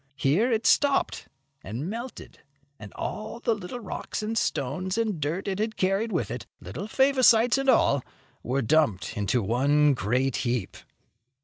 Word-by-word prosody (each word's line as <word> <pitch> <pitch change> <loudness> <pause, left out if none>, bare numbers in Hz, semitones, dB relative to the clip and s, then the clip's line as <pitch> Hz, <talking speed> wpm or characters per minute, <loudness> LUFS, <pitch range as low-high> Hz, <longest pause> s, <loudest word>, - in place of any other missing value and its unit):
Here 165 - +2
it 225 -1 0
stopped 285 -1 +2 0.4
and 115 - -5
melted, 235 +5 -7 0.4
and 105 -2 -10
all 215 +2 -5
the 230 -1 +1 0.2
rocks 215 0 -5
and 220 +1 -2
stones 180 - -1
and 215 -8 -1
dirt 165 +8 -2
it 195 0 -2
had 220 0 -2
carried 195 +4 0
with 135 - -1
it, 120 0 -6
little 190 - -7
Favosites 255 -1 +4
and 270 0 0
all, 140 - +4 0.4
were 130 +3 -1
dumped 110 - +1
into 105 +3 0
one 140 +7 +3
great 125 +3 0
heap. 120 -5 -2
175 Hz, 145 wpm, -26 LUFS, -, 0.4 s, Favosites